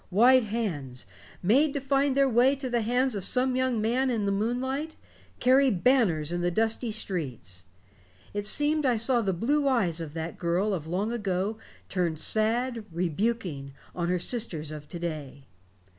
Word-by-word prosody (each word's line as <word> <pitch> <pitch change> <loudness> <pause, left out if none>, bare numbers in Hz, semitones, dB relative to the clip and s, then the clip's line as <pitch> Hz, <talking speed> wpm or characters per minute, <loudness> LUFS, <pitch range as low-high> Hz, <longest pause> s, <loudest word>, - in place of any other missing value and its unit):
White 245 +5 +5
hands, 160 - -4 0.4
made 275 - +3
to - - 0
find 275 0 +1
their 275 0 +5
way 255 +3 +4
to 265 -2 -5
the 240 -1 +1
hands 250 +3 +1
of 200 -3 -3
some 255 +3 +1
young 255 -3 +1
man 245 +5 +1
in 225 -4 -1
the 200 - +1
moonlight, 260 +9 -2 0.4
carry 265 +2 +4
banners 185 - +2
in 175 0 -2
the 175 - +1
dusty 225 +4 0
streets. 135 - -4 0.7
It 205 0 -2
seemed 295 +5 +2
I 250 -4 +2
saw 235 +2 +2
the 200 -3 0
blue 280 - 0
eyes 185 -11 +1
of 155 -1 -7
that 165 +1 -5
girl 180 +5 0
of 160 -4 -4
long 195 +7 -1
ago 205 -1 -2 0.3
turned, 175 -4 -1
sad, 230 +5 0
rebuking, 170 -4 -2 0.2
on 175 -1 -2
her 180 - +1
sisters 175 -7 -2
of 150 -1 -9
to 175 - -5
day. 150 -5 -6
220 Hz, 170 wpm, -27 LUFS, 175-255 Hz, 0.7 s, White